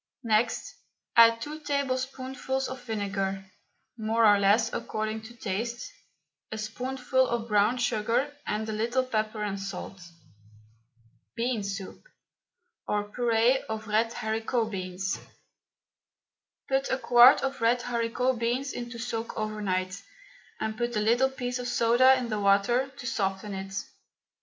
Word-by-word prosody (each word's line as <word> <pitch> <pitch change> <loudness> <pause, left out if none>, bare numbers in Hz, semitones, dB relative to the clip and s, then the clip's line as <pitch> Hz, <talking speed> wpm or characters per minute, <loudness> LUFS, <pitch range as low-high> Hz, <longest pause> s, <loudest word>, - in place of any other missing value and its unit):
Next 225 +1 0 0.4
add 230 0 +7
two 305 +1 -6
tablespoonfuls 265 -2 -2
of 260 0 -7
vinegar 195 -3 -2 0.5
more 225 +1 +2
or 205 -1 +6
less 200 +3 +3
according 215 0 -3
to 240 +2 -11
taste 235 - -4 0.6
a 220 - -4
spoonful 255 +4 0
of 235 -1 -2
brown 210 +3 +3
sugar, 245 +4 0
and 215 +1 -2
a - - -2
little 235 +4 0
pepper 215 -3 -2
and 200 -1 -3
salt. 195 -1 -6 1.3
BEAN 240 -1 -1
SOUP, 200 -1 -5 0.9
OR 205 0 -1
PUREE 240 +3 +2
OF 220 0 -4
RED 225 +2 +1
HARICOT 225 0 -1
BEANS. 185 0 -3 1.5
Put 270 0 0
a - - +1
quart 245 0 +7
of 270 -2 -2
red 240 +2 +3
haricot 240 +1 0
beans 250 +4 -1
into 240 0 -6
soak 230 -1 -4
overnight, 200 -3 -2 0.6
and 220 0 -2
put 240 +1 -2
a - - +2
little 235 +5 +3
piece 250 -1 -4
of 245 - -4
soda 245 +2 +5
in 250 -2 -3
the 215 -1 -1
water 205 +6 +3
to 265 -2 -11
soften 200 -4 -2
it. 195 0 -6
230 Hz, 135 wpm, -28 LUFS, 210-250 Hz, 1.5 s, add